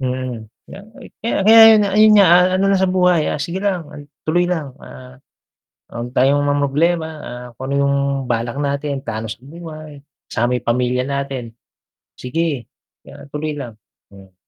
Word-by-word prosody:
Mhm. 125 -4 -4 0.2
Kaya - - -12
nga, 235 - -19
eh, - - -13
kaya 230 - -2
kaya 225 +2 +7
ayu 225 -1 +8 0.2
ayun 215 +1 +6
nga 200 -2 +6
a 175 - +8 0.2
ano 195 - 0
na 195 - +3
sa 190 - +2
buhay, 180 -3 +2
ah, - - -2
sige 170 +3 -4
lang 195 -4 -1 0.4
tuloy 175 +3 +1
lang, 155 -7 -3
ah, 130 0 -13 0.7
wag 120 +1 -6
tayong 135 +2 +2
mamroblema, 145 +4 +1 0.2
ah, 125 0 -8
kung 130 +4 -7
ano - - 0
yung 140 0 +1 0.3
balak 120 +2 -2
natin 140 0 -2
talo 110 -1 -5
sa 110 - -7
buhay, 155 -2 -10 0.3
sama 120 +2 -1
yung - - -11
pamilya 125 +1 0
natin. 135 -4 -4 0.6
Sige, 140 -2 -3 0.4
yan 140 - -13
tuloy 150 +1 -3
lang, 120 -7 -8 0.3
hmm. 95 -1 -16
140 Hz, 170 wpm, -18 LUFS, 125-170 Hz, 0.7 s, ayu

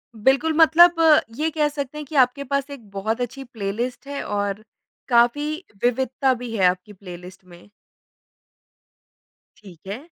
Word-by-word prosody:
बिल्कुल, 270 +8 +2
मतलब 335 +2 +7 0.4
ये 310 +5 -1
कह 300 -1 +1
सकते 285 -1 -6
हैं 300 - -6
कि 305 - -9
आपके 280 +3 -4
पास 280 +1 -2
एक 240 -7 -11
बहुत 215 +4 -3
अच्छी 255 +3 -5
प्लेलिस्ट 235 +3 -5
है 280 0 -5
और 205 0 -3 0.5
काफ़ी 240 +4 +3 0.4
विविधता 260 +2 +1
भी 240 -2 -6
है 190 - +3
आपकी 180 +3 0
प्लेलिस्ट 180 0 -12
में। 175 +2 -17 1.9
ठीक 190 -3 -16
है। 215 +8 -6
245 Hz, 140 wpm, -22 LUFS, 200-280 Hz, 1.9 s, मतलब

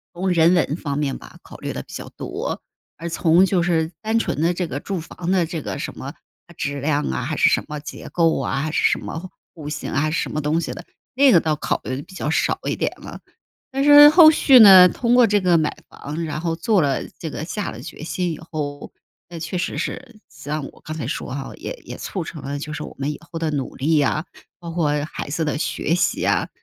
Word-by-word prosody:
从 185 +2 -1
人 170 -1 +4
文 160 -4 +1
方 145 -5 -4
面 140 -2 -1
吧， - - -14
考 - - -13
虑 - - -5
得 - - -4
比 - - -15
较 - - -7
多， - - -5 0.4
而 170 - -6
从 170 +2 +4
就 185 -2 +1
是 165 -2 0
单 220 +1 +1
纯 155 - -2
的 170 +2 +2
这 175 0 -2
个 140 - -4
住 190 +4 -4
房 170 +2 -5
的 185 -3 +3
这 160 -1 -5
个 - - -5
什 - - -6
么 - - -7 0.4
啊 - - -15
质 145 -1 -3
量 145 0 0
啊、 65 - -2
还 - - -3
是 - - +5
什 - - +1
么 150 0 -5
结 145 - -9
构 165 -4 +2
啊、 135 0 -1
还 155 +1 -2
是 - - 0
什 - - +1
么 175 +3 -7 0.2
户 150 -3 -8
型 150 -1 -5
啊 155 +1 0
什 160 - -1
么 155 - -2
东 150 +3 +1
西 - - -3
的， - - -10 0.3
那 275 0 +6
个 175 - +7
倒 155 -1 0
考 150 - -2
虑 130 - -3
得 135 - -5
比 165 - -15
较 165 -4 -3
少 160 - +1
一 - - -1
点 - - -1
了。 - - -10 0.5
但 270 +1 0
是 290 +1 +9
后 315 0 +9
续 275 -4 +6
呢， 190 -5 +10
通 235 +5 0
过 245 -1 +6
这 205 -1 +2
个 180 -3 +3
买 155 -1 -1
房， 150 +4 -6
然 155 -1 -4
后 165 0 -1
做 200 +2 +2
了 140 -2 0
这 160 - -5
个 150 - -5
下 205 +5 -4
了 110 - -9
决 150 +2 -9
心 180 +2 -2
以 155 - -7
后， 150 -3 -6 0.4
那 170 -1 -8
确 165 +3 -4
实 - - -3
是 235 -5 -5
像 150 0 -5
我 - - -21
刚 155 - -6
才 155 - -4
说 130 - -4
哈， 135 -1 -5
也 - - -6
也 - - -8
促 190 - -5
成 160 -2 -8
了 140 +1 -4
就 150 +1 -6
是 155 0 -5
我 - - -9
们 140 +2 -2
以 - - -8
后 165 - -5
的 165 -1 -1
努 140 -4 -3
力 155 +3 +2
啊， 150 +2 0 0.4
包 170 -1 -7
括 165 -3 0
孩 - - -7
子 160 +3 -1
的 150 -1 -1
学 160 +1 -1
习 175 - 0
啊。 - - +1
160 Hz, 270 characters per minute, -21 LUFS, 150-180 Hz, 0.5 s, 呢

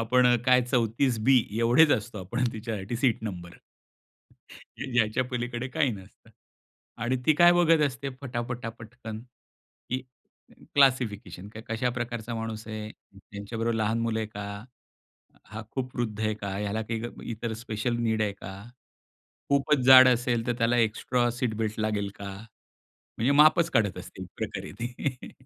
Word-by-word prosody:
आपण 125 +2 +3 0.2
काय 125 0 +6
34 120 0 +1
बी, 130 -3 +5
एवढेच 120 +7 +5
असतो 110 0 -2
आपण 120 +8 -2
तिच्यासाठी 110 -1 -4
सीट 120 -2 +1
नंबर. 90 -5 -6 1.3
या 120 -3 +2
याच्या 110 +4 -1
पलीकडे 120 0 -4
काही 130 +1 +1
नसतं. 95 -1 -13 0.7
आणि 125 +2 +1
ती 155 - +5
काय 175 +2 +7
बघत 165 -2 +4
असते 135 +1 -5
फटाफटा, 120 -2 -4
पटकन, 115 -1 -9 0.7
की 130 +1 -1 0.7
क्लासिफिकेशन. 110 -9 +2 0.2
कशा 115 +3 0
प्रकारचा 120 -1 -4
माणूस 115 -1 -5
आहे? 110 0 -5 0.2
त्यांच्याबरोबर 105 +4 -4
लहान 110 +1 0
मुलं 115 -1 -1
आहे 110 - -2
का? 100 0 -7 0.8
हा 110 +1 -8
खूप 130 0 -4
वृद्ध 110 -4 -2
आहे 110 -1 0
का? 100 -2 -5
ह्याला 105 +2 -2
काही 115 +1 -4
ग 120 +1 -7
इतर 115 0 -4
स्पेशल 120 +1 -2
नीड 110 -1 +1
आहे 105 - 0
का? 95 -1 -9 1.0
खूपच 140 +1 +3
जाड 130 -1 +10
असेल 120 -2 +1
तर 120 - +1
त्याला 115 +1 +2
एक्स्ट्रा 120 +2 +1
सीट 120 -2 -2
बेल्ट 110 -1 -2
लागेल 105 -2 -1
का? 100 0 -7 0.9
म्हणजे 125 +5 +2
मापच 155 +4 +5
काढत 105 -7 +1
असतील 95 +1 -9
एक - - -14
प्रकारे - - -5
ती. 125 +2 -4
115 Hz, 150 wpm, -27 LUFS, 110-125 Hz, 1.3 s, जाड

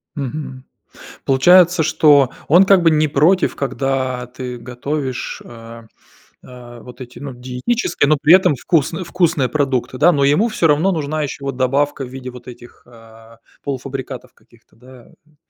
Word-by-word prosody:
Мгм. 135 -1 -6 0.6
Получается, 175 +5 +4
что 150 -4 +4 0.2
он 175 +6 +6
как 190 -2 +4
бы 165 - +4
не 155 -1 +2
против, 165 +7 +2
когда 135 -2 -2
ты 125 0 -8
готовишь, 130 +2 -5
а, 115 0 -12 0.6
а, 120 -2 -13
вот 125 +2 -14
эти, 125 0 -12
ну, 140 -2 -8
диетические, 130 - -2
но 155 - +4
при 155 +4 +6
этом 185 -6 +4
вкусны 165 +5 -1
вкусные 165 -7 0
продукты, 135 -4 -2
да? 175 +4 +5
Но 140 -2 +1
ему 150 +12 +2
всё 175 -6 0
равно 160 +6 +2
нужна 155 -1 -3
ещё 140 -1 -6
вот 135 -2 -4
добавка 135 +2 0
в - - -9
виде 130 0 -8
вот 125 0 -13
этих, 120 0 -14
а, 115 -1 -18 0.2
полуфабрикатов 135 -1 -6
каких-то, - - -27
да, 125 0 -17 0.2
м? 155 -1 -30
135 Hz, 160 wpm, -18 LUFS, 125-155 Hz, 0.6 s, он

